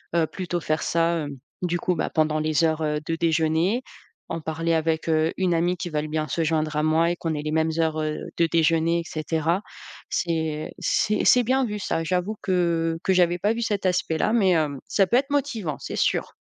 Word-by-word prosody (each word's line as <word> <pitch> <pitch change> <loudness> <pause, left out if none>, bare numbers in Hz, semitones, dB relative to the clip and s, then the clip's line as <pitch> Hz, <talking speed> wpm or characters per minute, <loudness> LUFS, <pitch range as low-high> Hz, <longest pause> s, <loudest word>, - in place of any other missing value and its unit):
heu, 165 -2 +3
plutôt 175 -1 -3
faire 155 -1 -1
ça, 170 0 +1
hem, 145 -3 -5 0.2
du 175 -1 -1
coup, 180 +1 0
bah, 160 - -1
pendant 155 -1 +1
les 155 +1 +2
heures, 160 0 0
heu, 150 -1 0
de 165 - 0
déjeuner. 165 +7 +1 0.5
En - - -3
parler 165 +1 -2
avec, 160 0 0
heu, 160 +1 +2
une 185 -2 +1
amie 175 +2 +1
qui 175 0 -4
veule 155 -1 -2
bien 155 0 -2
se 165 - 0
joindre 155 -1 0
à - - +2
moi 160 +2 +3
et - - -1
qu'on 165 -1 -2
ait 145 - -3
les 155 - -3
mêmes 160 +1 +1
heures, 160 -1 +1
heu, 155 0 -2 0.2
de 170 -1 +3
déjeuner, 165 +1 +2
et - - -7
cetera. 160 +4 -1 0.5
C'est 160 -3 -2
c'est 210 0 +1
c'est 250 - +6
bien 260 +3 +2
vu 210 -2 -3
ça. 165 -5 -2
J'avoue 180 +5 -1
que 170 -3 +1
que 190 - +1
j'avais 175 -1 +3
pas 205 +5 +1
vu 235 - -4
cet 205 -4 -1
aspect 180 -3 +1
là, 215 - +1
mais 200 -6 +4
hem, 150 -5 +1
ça 195 -2 +2
peut 235 - +3
être 275 +2 0
motivant, 250 - -1
c'est - - -6
sûr. - - 0
165 Hz, 220 wpm, -24 LUFS, 155-180 Hz, 0.5 s, c'est